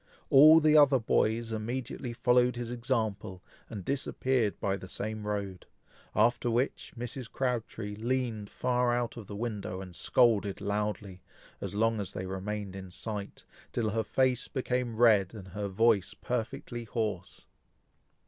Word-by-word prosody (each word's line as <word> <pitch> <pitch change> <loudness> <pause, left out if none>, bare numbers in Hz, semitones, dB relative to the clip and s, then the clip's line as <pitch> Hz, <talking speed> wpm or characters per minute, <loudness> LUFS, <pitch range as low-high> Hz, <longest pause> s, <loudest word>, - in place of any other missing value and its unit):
All 155 +4 +9
the 155 -1 +4
other 145 -3 +7
boys 115 0 +1
immediately 120 +3 -4
followed 125 +1 +3
his 120 -1 -4
example, 110 -6 -2 0.3
and 100 -6 -7
disappeared 130 -4 0
by 100 -1 0
the 95 -1 -9
same 110 +1 -4
road; 100 -3 -4 0.5
after 120 +2 +3
which, 120 +4 -1
Mrs. 120 +1 -6
Crabtree 115 -5 -2
leaned 115 -2 -2
far 125 -1 +1
out 120 -1 -1
of 115 -5 -9
the 100 - -7
window, 105 -4 -4
and 90 -2 -8
scolded 105 -5 +3
loudly, 105 -2 -3 0.4
as - - -5
long 115 +1 +2
as 100 - -4
they 95 - -4
remained 95 +1 -4
in 95 -1 -8
sight, 100 +2 -5 0.3
till 110 -3 -1
her 110 +2 0
face 130 +2 +1
became 125 -3 -2
red, 110 -4 +4
and 95 -3 -9
her 100 +2 -4
voice 100 0 +2
perfectly 120 0 -4
hoarse. 105 -5 -4
110 Hz, 145 wpm, -30 LUFS, 100-125 Hz, 0.5 s, All